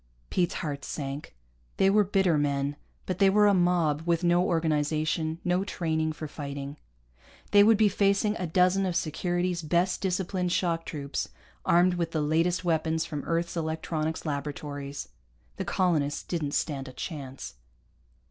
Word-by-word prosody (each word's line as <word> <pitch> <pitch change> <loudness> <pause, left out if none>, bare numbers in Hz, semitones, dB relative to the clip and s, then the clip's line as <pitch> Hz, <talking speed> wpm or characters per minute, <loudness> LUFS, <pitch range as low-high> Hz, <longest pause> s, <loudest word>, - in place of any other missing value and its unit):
Pete's 180 0 +1
heart 145 -5 -4
sank. 140 - -5 0.4
They 195 - +4
were 205 +2 +5
bitter 190 -3 +2
men, 140 -1 0 0.3
but 185 -1 -3
they 195 -1 +6
were 210 +2 +5
a 205 - +5
mob 175 -5 +2
with 170 0 +1
no 175 +1 +4
organization, 155 -1 0
no 180 +1 +1
training 160 -5 -1
for 155 +1 -6
fighting. 140 -1 -6 0.7
They 205 0 +8
would 220 +1 +6
be 215 0 +5
facing 200 +1 +2
a 180 - -3
dozen 185 +3 +3
of 180 - -2
Security's 175 +2 -1
best 170 +4 +1
disciplined 185 -1 -1
shock 170 -2 0
troops, 145 -2 -4 0.4
armed 175 +1 +4
with 170 -2 -2
the 155 - +1
latest 165 +4 +1
weapons 160 -1 +1
from 150 -3 -5
Earth's 170 +1 -1
electronics 160 0 -2
laboratories. 145 -1 -4 0.5
The - - -3
colonists 155 -6 +1
didn't 155 -5 -2
stand 135 -3 -1
a 130 - -9
chance. 140 -5 -6
165 Hz, 150 wpm, -28 LUFS, 150-180 Hz, 0.7 s, They